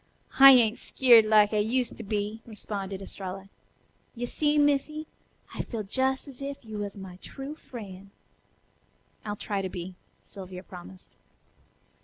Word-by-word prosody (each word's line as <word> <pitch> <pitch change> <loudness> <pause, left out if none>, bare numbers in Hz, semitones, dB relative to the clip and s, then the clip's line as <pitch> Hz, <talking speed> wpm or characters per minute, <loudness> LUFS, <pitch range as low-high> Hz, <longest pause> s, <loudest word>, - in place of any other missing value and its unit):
"I 275 0 +12
ain't 230 -3 +4
skeered 235 -4 +5
like 215 -1 +5
I - - +2
used 240 +3 0
to - - -7
be," 210 +1 -3
responded 200 -3 -6
Estralla. 195 0 -7 0.7
"Yo' 245 +1 -3
see, 295 +4 +1
Missy, 290 +1 +1 0.5
I - - -3
feels 215 -4 -6
jes' 265 +2 +1
as 275 -1 -11
if 275 -2 -6
you 215 -1 -6
was 205 0 -5
my 190 -2 -9
true 270 +8 -8
fr'en'." 200 -10 -10 1.1
"I'll 205 -1 -4
try 205 -1 -3
to 190 - -3
be," 180 0 -7 0.3
Sylvia 185 -2 -10
promised. 185 0 -13
215 Hz, 145 wpm, -27 LUFS, 195-260 Hz, 1.1 s, I